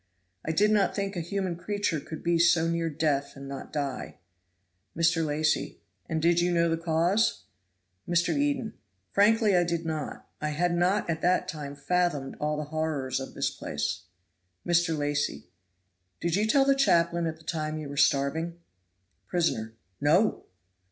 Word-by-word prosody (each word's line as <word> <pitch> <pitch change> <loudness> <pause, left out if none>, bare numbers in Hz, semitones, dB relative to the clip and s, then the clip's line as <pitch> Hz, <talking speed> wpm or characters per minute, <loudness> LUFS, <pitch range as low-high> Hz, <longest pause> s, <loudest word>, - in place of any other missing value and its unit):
I 160 - -1
did 210 +6 +3
not 205 -2 +2
think 200 -1 -2
a - - -2
human 185 +1 -2
creature 180 -2 -1
could 155 +2 -8
be 170 -1 +2
so 170 -1 +4
near 165 0 0
death 145 -2 0
and 135 0 -9
not 135 -1 -7
die." 140 -4 -4 0.8
Mr. 165 0 +3
Lacy. 155 0 0 0.3
"And 160 -1 0
did 170 +2 +3
you 175 +1 +2
know 170 -1 +3
the 165 - +2
cause?" 170 +6 +1 0.7
Mr. 175 - +2
Eden. 285 -5 0 0.4
"Frankly, 210 0 +4
I 175 - +4
did 170 -1 -2
not. 155 -2 -4
I 150 - -1
had 170 +4 0
not 185 +4 +2
at 165 -1 -2
that 180 0 +2
time 150 -5 -6
fathomed 175 -5 0
all 150 0 -1
the 150 - -2
horrors 150 -5 -1
of 135 - -8
this - - 0
place." 75 +4 -4 0.6
Mr. 170 -2 +2
Lacy. 145 0 -1 0.7
"Did 170 0 0
you 210 +2 +1
tell 270 +4 +4
the 275 - +5
chaplain 170 -10 +2
at 160 0 -4
the 160 - -19
time 155 -1 -3
you 155 -2 -5
were 140 - -7
starving?" 150 +4 +1 0.7
Prisoner. 115 -11 -1 0.3
"No!" 175 +9 +3
165 Hz, 165 wpm, -28 LUFS, 150-180 Hz, 0.8 s, the